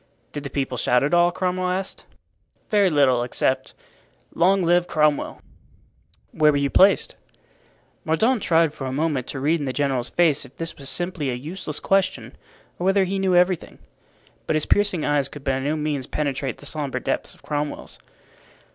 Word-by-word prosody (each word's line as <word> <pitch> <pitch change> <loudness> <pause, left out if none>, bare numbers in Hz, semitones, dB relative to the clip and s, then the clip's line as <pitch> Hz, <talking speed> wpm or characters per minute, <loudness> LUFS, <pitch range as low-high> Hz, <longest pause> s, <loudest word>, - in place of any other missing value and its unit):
"Did 145 - -5
the 140 - -5
people 135 -4 -3
shout 125 +1 +2
at 145 - 0
all?" 175 0 +5
Cromwell 185 0 -1
asked. 190 +1 -4 0.7
"Very 205 -3 +4
little, 135 -6 +3
except 125 +2 -1 0.6
'Long 190 +2 +3
live 175 +1 +3
Cromwell!'" 150 -2 0 0.9
"Where 150 -1 +4
were 145 - 0
you 140 -1 0
placed?" 195 +2 +4 0.9
Mordaunt 220 +9 +1
tried 165 -4 +3
for 135 -3 -6
a - - -3
moment 140 -2 -1
to 135 - -5
read 155 +5 +1
in 145 - -3
the - - 0
general's 135 -3 -1
face 160 -5 +2
if 135 0 -15
this 165 0 -5
was 140 -1 -7
simply 175 -5 -2
a 125 - -1
useless 155 +3 -5
question, 185 -11 0 0.4
or 175 - -2
whether 195 +1 +4
he 195 +1 -2
knew 190 -1 +2
everything. 180 -1 +1 0.7
But - - +1
his 155 - 0
piercing 200 -6 +1
eyes 145 -2 +1
could 145 0 -11
by 135 -2 0
no 145 +3 -1
means 150 -4 -2
penetrate 140 -3 -2
the - - -12
sombre 145 -2 -3
depths - - -3
of - - -24
Cromwell's. 145 0 -4
150 Hz, 175 wpm, -23 LUFS, 140-180 Hz, 0.9 s, all